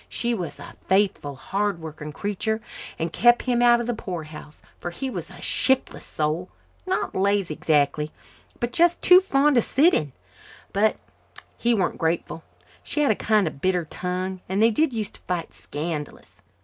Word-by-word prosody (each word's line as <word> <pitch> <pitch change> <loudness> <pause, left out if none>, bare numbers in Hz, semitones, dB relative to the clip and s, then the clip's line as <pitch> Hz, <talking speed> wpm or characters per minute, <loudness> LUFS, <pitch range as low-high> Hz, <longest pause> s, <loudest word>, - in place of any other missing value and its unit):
She 240 0 -1
was 180 -8 -4
a - - -11
faithful, 190 -7 +1
hard 195 +7 -2
working 155 -1 -7
creature 210 +6 -2 0.4
and 165 0 -3
kept 240 +1 +5
him 245 -2 +1
out 240 0 +6
of 240 - -2
the 240 - -1
poorhouse, 160 -7 -7 0.2
for 175 - -4
he 260 +10 -5
was - - -5
a - - -13
shiftless 265 0 0
soul, 155 +4 -2 0.4
not 370 - -1
lazy, 195 -3 +1
exactly, 150 0 +1 0.5
but 240 0 -1
just 345 0 +3
too 360 +1 +9
fond 285 -6 +3
of - - +1
sitting. 275 - +3 0.6
But 210 +2 +3 0.6
he 240 0 +2
weren't 190 -4 -1
grateful. 165 0 -1 0.4
She 300 - -2
had 285 - +4
a - - +2
kind 215 -1 +2
of 145 -4 -5
bitter 180 -2 +1
tongue 185 +3 -4
and 190 +1 0
they 225 +2 +5
did 305 +6 +2
use 220 -4 -3
to - - -11
fight 175 -2 -4
scandalous. 150 0 -6
195 Hz, 170 wpm, -24 LUFS, 165-240 Hz, 0.6 s, too